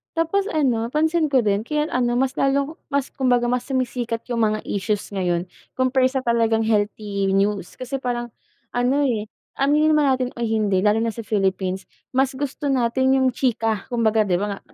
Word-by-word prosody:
tapos 385 Hz, +5 st, +1 dB
ano 250 Hz, -, +1 dB
pansin 315 Hz, +3 st, +1 dB
ko 260 Hz, -4 st, +2 dB
rin 205 Hz, +2 st, 0 dB
kaya 300 Hz, +1 st, -1 dB
ano 240 Hz, -1 st, +1 dB
mas 260 Hz, +1 st, +1 dB
lalong 280 Hz, +4 st, 0 dB
mas 280 Hz, -2 st, -1 dB
kumbaga 245 Hz, -3 st, +1 dB
mas 250 Hz, +1 st, -1 dB
sumisikat 245 Hz, -3 st, -2 dB
yung 235 Hz, -, 0 dB
mga 215 Hz, 0 st, 0 dB
issues 205 Hz, +1 st, -2 dB
ngayon 180 Hz, -2 st, -1 dB, 0.3 s
compare 255 Hz, 0 st, +2 dB
sa 265 Hz, 0 st, -2 dB
talagang 230 Hz, -1 st, +2 dB
healthy 205 Hz, -2 st, 0 dB
news 200 Hz, -2 st, 0 dB
kasi 255 Hz, +2 st, -4 dB
parang, 240 Hz, -1 st, -3 dB, 0.4 s
ano, 250 Hz, +4 st, +1 dB
eh, 215 Hz, -2 st, -1 dB, 0.3 s
aminin 300 Hz, +3 st, +3 dB
naman 300 Hz, -1 st, +3 dB
natin 255 Hz, -1 st, +1 dB
o -, -, -5 dB
hindi 215 Hz, -4 st, +1 dB
lalo 210 Hz, +1 st, +4 dB
na 230 Hz, -, +1 dB
sa 230 Hz, -, -6 dB
Philippines 190 Hz, -2 st, -1 dB, 0.3 s
mas 265 Hz, +1 st, +3 dB
gusto 285 Hz, +1 st, -3 dB
natin 260 Hz, +1 st, +2 dB
yung 260 Hz, -, +3 dB
chika 225 Hz, -5 st, 0 dB
kumbaga 225 Hz, -2 st, +2 dB
di 185 Hz, -, 0 dB
ba 200 Hz, 0 st, -3 dB
nga -, -, -12 dB
240 Hz, 180 wpm, -22 LUFS, 215-270 Hz, 0.4 s, lalo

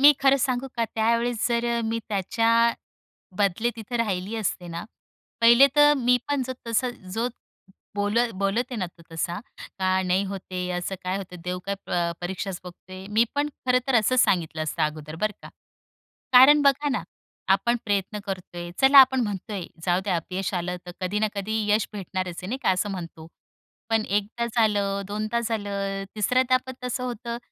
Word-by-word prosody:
मी 290 Hz, +2 st, +9 dB
खरं 275 Hz, 0 st, +5 dB
सांगू 260 Hz, 0 st, -1 dB
का, 230 Hz, -, +2 dB
त्यावेळेस 230 Hz, +1 st, +1 dB
जर 235 Hz, 0 st, 0 dB
अ, -, -, 0 dB
मी 225 Hz, +1 st, -1 dB
त्याच्या 230 Hz, +4 st, +2 dB, 0.7 s
बदले 205 Hz, +4 st, +1 dB
तिथं 225 Hz, +2 st, -5 dB
राहिली 205 Hz, -1 st, -1 dB
असते 185 Hz, -4 st, -2 dB
ना, 170 Hz, 0 st, -5 dB, 0.6 s
पहिले 235 Hz, +4 st, +8 dB
तर 295 Hz, 0 st, +7 dB
मी 250 Hz, -1 st, +3 dB
पण 285 Hz, -2 st, +1 dB
जो 260 Hz, -, -3 dB
तस 230 Hz, +3 st, +1 dB, 0.3 s
जो 235 Hz, +2 st, 0 dB, 0.7 s
बोल 205 Hz, +2 st, 0 dB, 0.2 s
बोलत 200 Hz, +5 st, +1 dB
आहे -, -, -3 dB
ना, 185 Hz, -, -1 dB
तो 170 Hz, -, -16 dB
तसा, 170 Hz, +3 st, -2 dB, 0.4 s
का 185 Hz, 0 st, +2 dB
नाही 185 Hz, +2 st, +1 dB
होते 185 Hz, -1 st, -5 dB
असं 185 Hz, +2 st, -3 dB
काय 185 Hz, +1 st, -1 dB
होतं? 185 Hz, -2 st, -8 dB
देव 180 Hz, 0 st, -3 dB
काय 200 Hz, -, -1 dB
प 170 Hz, -1 st, 0 dB
परीक्षाच 190 Hz, +1 st, -4 dB
बघतोय. 185 Hz, +1 st, -11 dB
मी 220 Hz, +3 st, +4 dB
पण 290 Hz, +1 st, +1 dB, 0.2 s
खरं 250 Hz, 0 st, +4 dB
तर 265 Hz, -, +2 dB
असं 225 Hz, +3 st, +3 dB
सांगितलं 160 Hz, -3 st, 0 dB
असतं 155 Hz, +1 st, -1 dB
अगोदर, 155 Hz, 0 st, -4 dB
बरं 215 Hz, +5 st, 0 dB
का? -, -, -10 dB, 0.8 s
कारण 285 Hz, +4 st, +9 dB
बघा 285 Hz, +1 st, +3 dB
ना, -, -, -1 dB, 0.5 s
आपण 235 Hz, +5 st, +2 dB
प्रयत्न 205 Hz, 0 st, -1 dB
करतोय, 175 Hz, -3 st, -6 dB
चला 270 Hz, +1 st, +7 dB
आपण 265 Hz, 0 st, +6 dB
म्हणतोय 200 Hz, -3 st, -4 dB, 0.2 s
जाऊ 175 Hz, 0 st, +2 dB
द्या 190 Hz, -4 st, 0 dB
अपयश 185 Hz, +4 st, -3 dB
आलं, 180 Hz, 0 st, -2 dB
तर 175 Hz, -, -7 dB
कधी 190 Hz, +3 st, -1 dB
ना 215 Hz, -, +2 dB
कधी 205 Hz, +2 st, -2 dB, 0.2 s
यश 210 Hz, 0 st, +2 dB
भेटणारच 185 Hz, -3 st, -4 dB
आहे, 180 Hz, -, -6 dB
नाही 255 Hz, +5 st, -2 dB
का? -, -, +3 dB
असं 185 Hz, +3 st, 0 dB
म्हणतो. 165 Hz, -3 st, -7 dB, 0.6 s
पण 225 Hz, -1 st, +2 dB
1दा 210 Hz, +4 st, -1 dB
झालं, 205 Hz, -3 st, +2 dB
2दा 215 Hz, +3 st, -1 dB
झालं, 200 Hz, -3 st, -2 dB
3ऱ्यांदा 255 Hz, +4 st, +3 dB
पण 260 Hz, -, -6 dB
तसं 250 Hz, 0 st, -2 dB
होतं. 235 Hz, -1 st, -4 dB
205 Hz, 175 wpm, -25 LUFS, 185-235 Hz, 0.8 s, मी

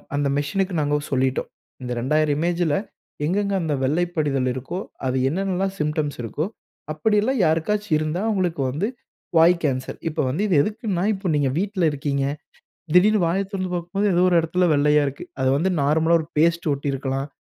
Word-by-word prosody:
அந்த 145 Hz, 0 st, +1 dB
மெசினுக்கு 185 Hz, +7 st, -1 dB
நாங்க 145 Hz, 0 st, +1 dB, 0.2 s
சொல்லிட்டோம். 130 Hz, -1 st, 0 dB, 0.3 s
இந்த 125 Hz, -1 st, -5 dB
2,000 150 Hz, +4 st, +1 dB
இமேஜ்ல, 170 Hz, -2 st, +1 dB, 0.5 s
எங்க 175 Hz, +6 st, 0 dB
எங்க 200 Hz, 0 st, -2 dB
அந்த 160 Hz, -3 st, -1 dB
வெள்ளை 155 Hz, +7 st, +2 dB
படிதல் 140 Hz, -5 st, 0 dB
இருக்கோ, 130 Hz, +8 st, -5 dB, 0.3 s
அதுல 130 Hz, 0 st, +1 dB
என்னென்னலாம் 190 Hz, +3 st, -1 dB
சிம்ப்டம்ஸ் 150 Hz, -1 st, -1 dB
இருக்கோ, 120 Hz, +7 st, -3 dB, 0.5 s
அப்டில்லாம் 215 Hz, -, +1 dB
யாருக்காச்சும் 165 Hz, +4 st, +1 dB
இருந்தா, 155 Hz, +4 st, -2 dB
அவுங்களுக்கு 180 Hz, -8 st, 0 dB
வந்து 155 Hz, +10 st, -1 dB, 0.5 s
வாய் 165 Hz, +2 st, +6 dB
கேன்சர். 130 Hz, -3 st, -2 dB
இப்ப 155 Hz, -, -6 dB
வந்து 150 Hz, +9 st, -2 dB
இது 185 Hz, -, +2 dB
எதுக்குன்னா, 210 Hz, -3 st, -2 dB
இப்ப 190 Hz, -2 st, -3 dB
நீங்க 145 Hz, -2 st, +2 dB
வீட்ல 195 Hz, -1 st, -1 dB
இருக்கீங்க. 140 Hz, -1 st, -1 dB, 0.7 s
திடீர்ன்னு 205 Hz, +3 st, +5 dB
வாய 175 Hz, +4 st, +1 dB
திறந்து 185 Hz, -2 st, -3 dB
பாக்கும்போது, 175 Hz, +4 st, -2 dB
ஏதோ 175 Hz, -, +3 dB
ஒரு 175 Hz, -, +2 dB
எடத்தில 175 Hz, +2 st, +1 dB
வெள்ளையா 150 Hz, +1 st, +4 dB
இருக்கு. 140 Hz, 0 st, -6 dB, 0.2 s
அது 130 Hz, -, +3 dB
வந்து 175 Hz, +6 st, +1 dB
நார்மலா 160 Hz, +4 st, +3 dB
ஒரு 155 Hz, -, -10 dB
பேஸ்ட் 170 Hz, +1 st, +2 dB
ஒட்டியிருக்கலாம். 135 Hz, -1 st, -2 dB
160 Hz, 160 wpm, -23 LUFS, 145-185 Hz, 0.7 s, வாய்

